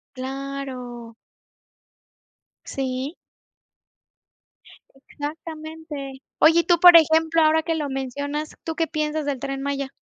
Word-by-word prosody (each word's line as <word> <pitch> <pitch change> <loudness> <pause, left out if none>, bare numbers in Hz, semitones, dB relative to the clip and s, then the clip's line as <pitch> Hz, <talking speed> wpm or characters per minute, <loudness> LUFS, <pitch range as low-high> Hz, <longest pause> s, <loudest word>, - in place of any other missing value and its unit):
Claro. 260 -3 -6 1.5
Sí. 265 +2 -3 2.0
Exactamente. 310 -2 -7 0.2
Oye, 330 +2 +6
y - - -2
tú, 345 0 +3
por 355 0 +9
ejemplo, 320 0 +4
ahora 315 +1 +4
que 330 0 -1
lo 300 -2 -2
mencionas, 285 +3 -4
¿tú 325 - -3
qué 330 -1 +1
piensas 305 -1 -2
del 280 -3 -2
Tren 275 +1 -4
Maya? 280 -1 -2
290 Hz, 110 wpm, -23 LUFS, 270-320 Hz, 2.0 s, por